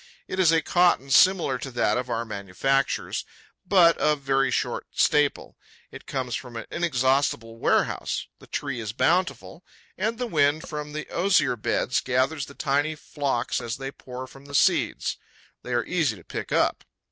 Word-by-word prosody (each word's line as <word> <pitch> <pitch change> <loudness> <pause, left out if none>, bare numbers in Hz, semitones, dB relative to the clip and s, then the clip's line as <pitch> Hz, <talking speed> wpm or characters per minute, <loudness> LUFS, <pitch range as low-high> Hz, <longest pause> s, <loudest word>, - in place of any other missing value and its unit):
It 185 - -4
is 175 -4 +5
a 165 -1 +3
cotton 175 -7 +2
similar 165 -5 +4
to 135 - -5
that 120 -4 +1
of 125 0 -3
our 115 0 -1
manufactures, 110 +7 -1 0.4
but 175 -4 +6
of 150 -1 +2
very 135 0 +2
short - - -2
staple. 145 -1 +1 0.3
It - - -11
comes 130 -3 -3
from 125 0 -5
an 115 - -5
inexhaustible 130 -7 0
warehouse: - - 0
the - - -16
tree 140 -4 -3
is 110 -2 -4
bountiful; 170 +6 0 0.4
and 220 +4 -1
the 250 - -2
wind 155 -6 +1
from 150 -1 -6
the 155 0 -5
osier 185 -6 +2
beds 105 - 0
gathers 130 +4 0
the 140 - -13
tiny 145 +2 0
flocks 140 -5 -2
as 120 +2 -4
they 135 0 -5
pour 130 -1 -8
from 135 +1 -15
the 140 0 -7
seeds. - - +2 0.4
They 125 - -8
are 120 -1 +1
easy 160 -10 0
to 85 - -15
pick - - -6
up. - - +1
135 Hz, 170 wpm, -25 LUFS, 125-160 Hz, 0.4 s, but